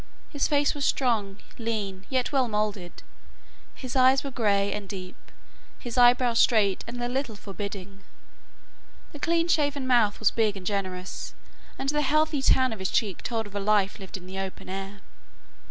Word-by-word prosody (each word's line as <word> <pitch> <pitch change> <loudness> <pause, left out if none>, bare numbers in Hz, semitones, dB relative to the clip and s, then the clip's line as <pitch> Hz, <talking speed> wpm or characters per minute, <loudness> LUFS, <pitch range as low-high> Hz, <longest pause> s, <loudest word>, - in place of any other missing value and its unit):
His 285 - 0
face 290 -1 +2
was 290 -2 -4
strong, 220 -8 +1 0.2
lean, 205 -5 -3
yet 255 -2 0
well 265 -3 +2
moulded. 210 -4 -3 0.7
His 255 0 -7
eyes 260 +1 +5
were 275 - -5
grey 200 -5 +1
and 205 -2 -6
deep, 185 -2 -7 0.6
his 240 -2 -7
eyebrows 245 -1 +5
straight 210 -5 +3
and 245 +1 -6
a - - 0
little 250 -2 -2
forbidding. 200 -1 -7 1.1
The 295 - -10
clean 335 +2 +1
shaven 290 -5 +1
mouth 235 -5 +3
was 220 - +3
big 215 -3 +1
and 185 - -10
generous, 185 -2 -4 0.4
and 270 - -2
the 295 +1 +1
healthy 305 0 +2
tan 260 -2 +3
of 220 - -8
his 190 - -2
cheek 200 -5 0
told 225 -2 -2
of 205 - -12
a 205 - -2
life 205 0 +1
lived 190 -1 -7
in 180 - -13
the 190 +1 -6
open 190 -1 -6
air. 195 +1 -6
220 Hz, 170 wpm, -26 LUFS, 195-260 Hz, 1.1 s, eyes